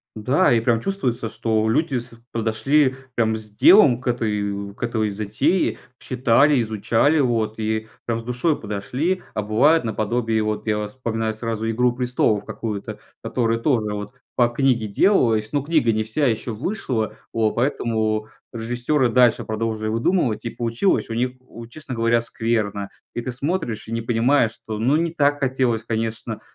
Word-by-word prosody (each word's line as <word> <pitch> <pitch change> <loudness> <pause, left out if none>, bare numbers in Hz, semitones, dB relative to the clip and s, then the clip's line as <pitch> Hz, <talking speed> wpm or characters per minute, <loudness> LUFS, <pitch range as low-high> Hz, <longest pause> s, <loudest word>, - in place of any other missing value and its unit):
Да, 130 +11 +2
и 115 - +4
прям 115 0 +1
чувствуется, 125 - -2
что 110 -1 0
люди 140 +4 +1
с 120 0 -6 0.2
подошли 125 +5 +2 0.2
прям 110 -1 +1
с 110 -1 -9
делом 125 - +6
к 130 - -8
этой, 100 -4 -2
к - - -9
этой 110 -3 0
затее, 110 - 0 0.2
читали, 130 +2 +3
изучали, 115 +7 +1
вот 115 -5 0
и 110 0 -1 0.2
прям 115 -1 -1
с 115 - -8
душой 125 +6 0
подошли. 125 - -2
А 110 - 0
бывает 120 +8 +3
наподобие, 110 +1 0
вот 105 +1 -3
я 105 -1 0
вспоминаю 115 -1 -3
сразу 115 0 -3
"Игру 125 +2 +2
престолов" 125 -4 +1
какую-то, 105 -3 -5 0.2
которая 115 -2 0
тоже 115 -4 0
вот 105 +2 -5 0.2
по 120 -1 +3
книге 120 -3 +1
делалась, 110 - +2
но 145 - +2
книга 145 -6 +2
не 110 0 0
вся 115 +7 0
еще 115 +1 -1
вышла, 115 - -3 0.2
вот 110 -2 +1
поэтому 110 -4 0 0.3
режиссеры 120 +4 0
дальше 120 0 +3
продолжили 110 0 -2
выдумывать, 115 - 0
и 115 - -3
получилось 115 +8 0
у - - -3
них, 125 +2 0
у 120 -2 -12
честно 135 +1 -7
говоря, 115 0 +2
скверно, 110 -4 -2 0.3
и 120 - -2
ты 130 - -4
смотришь 135 - -3
и 115 - -5
не 115 - -1
понимаешь, 120 +1 +2
что, 110 -1 -7
ну, 130 +8 +2
не 165 0 -1
так 145 -2 +2
хотелось, 130 -4 0
конечно, 115 0 -3
115 Hz, 165 wpm, -22 LUFS, 110-130 Hz, 0.3 s, делом